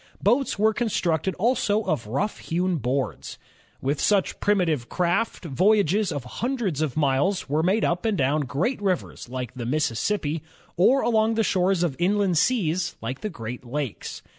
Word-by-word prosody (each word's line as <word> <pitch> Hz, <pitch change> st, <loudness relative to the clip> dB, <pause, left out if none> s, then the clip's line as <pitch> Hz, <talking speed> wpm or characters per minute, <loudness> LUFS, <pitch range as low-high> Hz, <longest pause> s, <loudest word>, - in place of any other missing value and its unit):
Boats 245 Hz, +6 st, +2 dB
were 220 Hz, +2 st, +3 dB
constructed 190 Hz, -6 st, 0 dB
also 215 Hz, 0 st, +1 dB
of 120 Hz, -, -2 dB
rough 190 Hz, -, -2 dB
hewn 180 Hz, +1 st, -1 dB
boards. 130 Hz, 0 st, -3 dB, 0.4 s
With 140 Hz, +2 st, -1 dB
such 200 Hz, -3 st, +2 dB
primitive 170 Hz, -, +1 dB
craft, 180 Hz, +3 st, 0 dB
voyages 195 Hz, +4 st, +2 dB
of 145 Hz, -4 st, -3 dB
hundreds 215 Hz, -, -2 dB
of 155 Hz, -3 st, -2 dB
miles 145 Hz, +6 st, +1 dB
were 150 Hz, +3 st, +1 dB
made 190 Hz, +6 st, +2 dB
up 175 Hz, +1 st, 0 dB
and 220 Hz, -3 st, +1 dB
down 140 Hz, +2 st, +2 dB
great 185 Hz, -, -1 dB
rivers 185 Hz, -10 st, -2 dB
like 125 Hz, -2 st, -5 dB
the 120 Hz, -2 st, -5 dB
Mississippi, 150 Hz, -, 0 dB, 0.3 s
or 255 Hz, +10 st, +4 dB
along 225 Hz, -1 st, +2 dB
the 225 Hz, -, +2 dB
shores 185 Hz, -2 st, +2 dB
of 160 Hz, -6 st, 0 dB
inland 190 Hz, -2 st, +2 dB
seas 175 Hz, -4 st, +1 dB
like 130 Hz, +4 st, -5 dB
the 215 Hz, -, -2 dB
Great 120 Hz, -, -7 dB
Lakes. 130 Hz, -1 st, -5 dB
175 Hz, 160 wpm, -25 LUFS, 140-210 Hz, 0.4 s, or